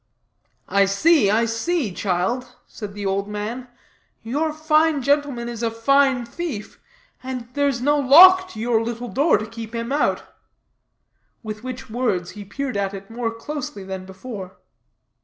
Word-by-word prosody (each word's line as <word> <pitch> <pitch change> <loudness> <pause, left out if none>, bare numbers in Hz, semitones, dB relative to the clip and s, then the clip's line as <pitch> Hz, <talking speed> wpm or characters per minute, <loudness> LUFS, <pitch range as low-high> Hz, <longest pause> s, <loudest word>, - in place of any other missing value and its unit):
"I 200 0 +3
see, 205 - +3
I 220 +3 +3
see, 230 - -1
child," 205 +8 -2
said 205 -2 -9
the 205 -1 -5
old 195 +1 -1
man; 215 +5 -5 0.6
"your 290 +8 -1
fine 310 -1 +2
gentleman 280 -4 +1
is 235 -1 -6
a 230 - +1
fine 260 +2 +2
thief, 250 -4 -6 0.4
and 255 -2 -5
there's 280 -4 0
no 290 +2 +3
lock 370 +7 +8
to 215 - -10
your 230 0 +1
little 235 +1 -4
door 285 +1 +3
to 215 - -4
keep 225 +1 -8
him 230 +2 -3
out;" 290 +1 +1 1.2
with 215 0 -6
which 255 -3 -7
words 205 -8 -1
he 210 - -9
peered 250 +4 -4
at 200 0 -1
it 195 +2 -10
more 235 0 -2
closely 230 -2 -6
than 190 -1 -6
before. 190 -1 -8
235 Hz, 155 wpm, -22 LUFS, 210-280 Hz, 1.2 s, lock